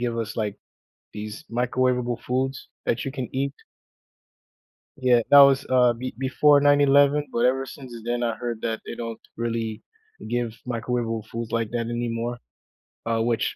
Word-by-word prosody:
give 120 -1 -1
us, 110 -1 -4
like, 105 -3 -2 0.6
these 105 +6 -7
microwavable 125 0 0
foods 130 +1 -2 0.2
that 115 - 0
you 135 - -3
can 130 -3 -4
eat. 135 +1 -1 1.4
Yeah, 125 -3 +4
that 145 - +9
was, 140 0 +6
uh, 125 -2 +5
be 130 +2 -6
before 140 +2 +4
9/11, 145 0 +4
but 120 +1 +2
ever 135 +1 +1
since 130 -2 -10
then, 120 +1 -1
I 115 -1 0
heard 115 0 -4
that 115 -1 -2
they - - -6
don't 115 -1 -6 0.2
really 115 -2 -3 0.5
give 120 -2 -1
microwavable 115 -2 -2
foods 115 0 -5
like 115 -1 -1
that 115 -1 -2
anymore, 120 0 -2 0.7
uh, 115 -1 0
which 115 0 0
120 Hz, 155 wpm, -25 LUFS, 115-130 Hz, 1.4 s, that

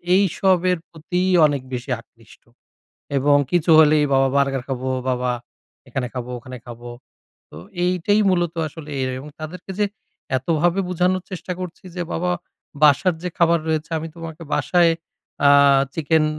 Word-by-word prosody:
এইসবের 185 -1 +2
প্রতি 175 +2 -3 0.2
অনেক 145 -3 0
বেশি 125 +2 -4
আকৃষ্ট। 115 -1 -20 0.8
এবং 145 +1 +4
কিছু 175 -1 +2
হলেই 150 -1 +6
বাবা 135 0 +4
বার্গার 135 -2 +1
খাবো, 130 0 -3 0.2
বাবা 125 0 0 0.6
এখানে 125 -2 -2
খাবো 125 0 -5
ওখানে 125 +1 -9
খাবো। 120 0 -9 0.6
তো 75 - -13 0.3
এইটাই 185 +4 +2
মূলত 175 -2 0
আসলে 150 0 -10
এর 130 - 0
এবং 145 +3 -9
তাদেরকে 175 +4 -8
যে 210 - +3 0.5
এতভাবে 170 +7 +1
বুঝানোর 180 +1 +1
চেষ্টা 180 0 -5
করছি 180 0 -7
যে 175 - -1
বাবা 180 +2 -1 0.5
বাসার 160 +5 +4
যে 180 - -2
খাবার 170 0 +4
রয়েছে 155 0 -1
আমি 165 +1 -5
তোমাকে 165 0 -8
বাসায় 175 -2 +3 0.6
আ - - +7 0.4
চিকেন 160 0 +2
160 Hz, 145 wpm, -21 LUFS, 135-180 Hz, 0.8 s, আ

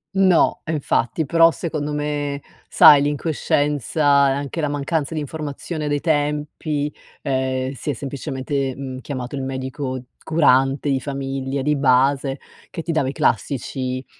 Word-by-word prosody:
No 190 -3 +3
infatti, 155 -1 0
però 165 +3 +5
secondo 155 -3 -3
me 145 -1 -2 0.3
sai 145 -1 +8
l'incoscienza 145 -1 +1
e - - +2
anche 140 +4 -3
la 150 - 0
mancanza 145 +2 -2
di - - -1
informazione 150 +1 -5
dei 145 -1 0
tempi, 150 -1 -1 0.3
ehm, 130 -1 -1
si 140 - -6
è 145 - +1
semplicemente, 135 0 -3
mhmm, 130 -1 -6
chiamato 130 -2 -5
il 135 - -3
medico 130 0 -4 0.2
curante 140 -2 +3
di 135 - +1
famiglia 135 -1 -3
di 150 +2 +2
base 135 0 +2 0.3
che 165 - -6
ti 170 - -2
dava 155 -5 +1
i - - -2
classici 130 -3 -1
140 Hz, 140 wpm, -21 LUFS, 135-150 Hz, 0.3 s, sai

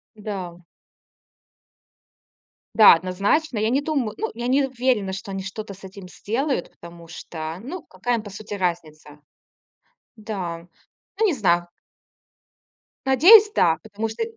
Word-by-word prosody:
Да. 190 -5 -7 2.1
Да, 215 -5 +9
однозначно, 200 - -1
я 215 +1 +1
не 270 +3 +2
дум 280 -8 -1
ну, 445 +1 -3
я 240 +1 -5
не 275 +2 +2
уверена, 245 -6 -1
что 195 +1 -7
они 195 0 -4
что-то 200 +1 -7
с 195 - -18
этим 190 0 -10
сделают, 245 - -3
потому 170 -1 -14
что 160 0 -7
ну 310 - -7
какая 240 - -2
им 220 - -5
по 205 - -10
сути 210 +1 -8
разница. 155 -5 -4 1.0
Да, 180 -6 -6 0.5
ну 445 - +3
не 375 - +2
знаю. 175 -7 +1 1.4
Надеюсь 405 - +7
да. 165 -1 +3
Потому 220 +1 -4
что 220 - -5
205 Hz, 135 wpm, -23 LUFS, 180-250 Hz, 2.1 s, Да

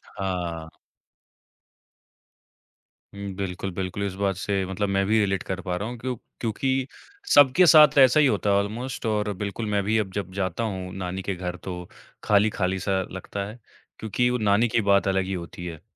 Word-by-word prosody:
हाँ। 90 -5 -4 2.4
हुँ। 100 -1 -6
बिल्कुल, 95 0 -4
बिल्कुल। 95 +2 -3
इस 100 -2 -3
बात 95 -2 +1
से 100 0 -1
मतलब 95 +2 -2
मैं 95 0 +1
भी 110 +1 +3
रिलेट 95 -2 0
कर 95 0 -4
पा 90 -1 -2
रहा 100 +5 -3
हूँ, 120 - -6
क्यों 125 +1 -3 0.2
क्योंकि 130 +4 -1 0.5
सबके 145 +6 +7
साथ 150 -3 +7
ऐसा 130 +2 +7
ही 150 - +5
होता 105 -4 +1
है 100 - +4
ऑलमोस्ट 115 +5 -3
और 105 -1 0
बिल्कुल 105 +3 -3
मैं 100 -1 +1
भी 110 +2 +2
अब 95 -3 -2
जब 100 -1 -4
जाता 95 +2 -2
हूँ 95 -4 -4
नानी 95 0 -4
के 100 - -3
घर, 90 0 -5
तो 90 -1 -7 0.4
खाली-खाली-सा 100 -2 +1
लगता 95 +2 -5
है, 110 - -10 0.4
क्योंकि 120 +3 0
वो 125 - 0
नानी 105 +2 +3
की 115 +1 +1
बात 100 0 +3
अलग 95 -1 +1
ही 95 - -4
होती 85 -1 -6
है। 80 -3 -8
100 Hz, 180 wpm, -25 LUFS, 95-110 Hz, 2.4 s, सबके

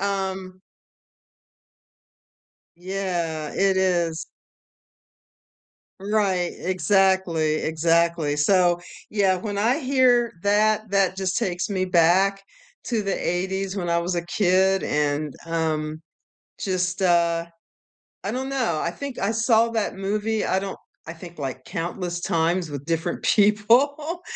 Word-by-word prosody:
um 190 -2 -3 2.2
Yeah, 175 -4 -3
it 195 -1 +2
is. 170 -4 0 1.7
Right, 195 -3 0
exactly, 185 -4 +2
exactly. 165 -1 +1
So, 175 +3 +3 0.3
yeah, 195 -3 +2
when 205 +2 -4
I 235 +8 +2
hear 255 -4 +3
that, 215 +1 +2
that 195 -2 +2
just 190 0 -1
takes 180 -6 -1
me 190 -2 -1
back 185 +3 +3 0.4
to 230 -3 -1
the 195 -1 -2
'80s 190 +2 -2
when 175 -2 -2
I 170 - +2
was 175 +1 -2
a 170 -1 -2
kid, 190 +1 +2
and, 150 0 -1
um, 155 -2 -2 0.6
just, 185 -1 -2
uh 170 -2 +2 0.8
I 200 - -2
don't 260 +2 -3
know. 245 - -1
I 170 - -1
think 275 +7 -7
I 195 - 0
saw 225 0 +3
that 225 -2 -1
movie. 210 +3 -1
I 190 - +1
don't 195 0 -5 0.3
I - - -4
think, 170 0 -12
like, 130 -2 -5
countless 175 +1 -4
times 170 0 0
with 140 -1 -6
different 165 +1 -2
people. 250 - +3
185 Hz, 120 wpm, -23 LUFS, 170-205 Hz, 2.2 s, So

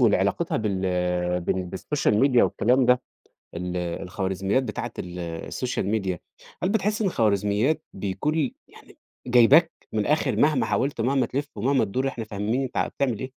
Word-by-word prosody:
واللي - - +5
علاقتها - - 0
بال 100 -4 -1 0.6
بال 90 +2 -1
بالسوشيال 105 +3 0
ميديا 130 -2 +5
والكلام 125 +2 +2
ده 125 0 +4 0.5
ال 90 +1 -4
الخوارزميات 95 +5 -1
بتاعة - - -4
ال 90 0 -6
السوشيال 85 +7 -3
ميديا 95 -4 -1 0.4
هل 185 - +2
بتحس 210 +1 0
إن 210 - +1
الخوارزميات 105 - +1
بيكون 100 +10 -2
لي 150 -5 0
يعني - - -17 0.3
جايباك 125 +7 +6 0.2
من 110 - 0
الآخر 150 +9 +1
مهما 150 -2 +3
حاولت 135 -3 -1
ومهما 130 +3 +2
تلِف 145 +3 -3
ومهما 130 +4 +2
تدور 130 +7 -1
إحنا 115 -4 -5
فاهمين 105 +5 -2
أنت 130 - -5
ع - - +2
بتعمل 125 -6 -1
إيه؟ 130 - -4
115 Hz, 160 wpm, -25 LUFS, 95-135 Hz, 0.6 s, جايباك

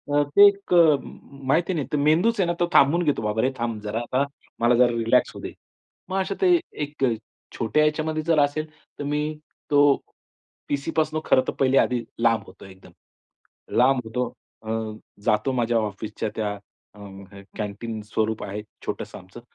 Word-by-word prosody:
अ, 145 - +5
ते 205 0 +10
एक 200 -2 -1
अ, 160 -4 +7
माहिती 140 +7 -2
नाही. 150 -5 -2
ते - - +2
मेंदूच 165 +10 +3
आहे 180 - +2
ना 175 - +1
तो 175 - +3
थांबून 165 +6 +5
घेतो. 145 -7 +1
"बाबा 105 +1 0
रे 130 - +2
थांब 115 -2 -2
जरा, 105 +2 -2
आता 130 +3 0 0.4
मला 120 +1 +4
जरा 125 +1 +5
रिलॅक्स 115 0 +2
होऊ - - -8
दे." - - -6 0.6
मग 190 - -1
अशा 190 - -2
ते 360 -2 +5 0.2
एक 145 -1 -6 0.6
छोट्या 135 +7 +2
ह्याच्यामध्ये 155 +1 0
जर 165 -1 +2
असेल, 145 +2 0 0.3
तर - - -3
मी 150 +1 -1 0.5
तो 145 -1 +6 0.7
पी-सीपासनं 155 +2 -1
खरं 130 - +4
तर - - -1
पहिले 135 0 +3
आधी 125 -2 +2 0.2
लांब 115 -3 +2
होतो - - -14
एकदम. 95 0 -15 0.9
लांब 130 +1 +4
होतो. 125 +2 -2 0.4
अ, 110 - -8 0.6
जातो 105 +4 +2
माझ्या 120 -2 +1
ऑफिसच्या 105 +1 -4
त्या 105 -2 -2 0.4
अ, - - -15 0.6
कॅन्टीन 110 +1 -5
स्वरूप 110 0 0
आहे 100 +2 -5 0.2
छोटंसं - - -5
आमचं. 95 +5 -13
135 Hz, 170 wpm, -24 LUFS, 110-155 Hz, 0.9 s, ते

